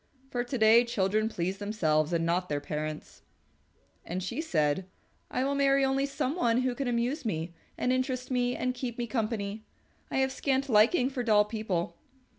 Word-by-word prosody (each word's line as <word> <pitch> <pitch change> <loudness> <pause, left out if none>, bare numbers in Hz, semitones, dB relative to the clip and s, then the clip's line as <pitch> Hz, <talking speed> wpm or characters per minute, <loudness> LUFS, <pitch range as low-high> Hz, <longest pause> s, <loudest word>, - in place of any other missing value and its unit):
For 245 -1 -1
to 250 +2 -3
day 225 +1 +6
children 215 -1 0
please 185 -1 -3
themselves 160 -7 +1
and 165 -1 +1
not 180 +2 0
their 145 -1 0
parents." 155 +1 -5 0.8
And 180 +2 -4
she 190 - -3
said, 160 - 0 0.4
"I 255 - -1
will 275 +1 0
marry 275 -1 +3
only 270 +1 +1
some 275 0 -2
one 240 -8 +2
who 255 -1 0
can 270 +2 -3
amuse 245 +5 0
me 170 -6 -3 0.2
and 250 - +1
interest 255 0 -2
me 245 -1 +1
and 255 0 -1
keep 245 -2 -5
me 240 - -1
company. 215 -3 -2 0.5
I - - -2
have 265 0 +2
scant 270 0 0
liking 245 +5 +4
for 260 -2 -2
dull 210 -3 +4
people." 200 -6 -3
230 Hz, 180 wpm, -29 LUFS, 185-255 Hz, 0.8 s, day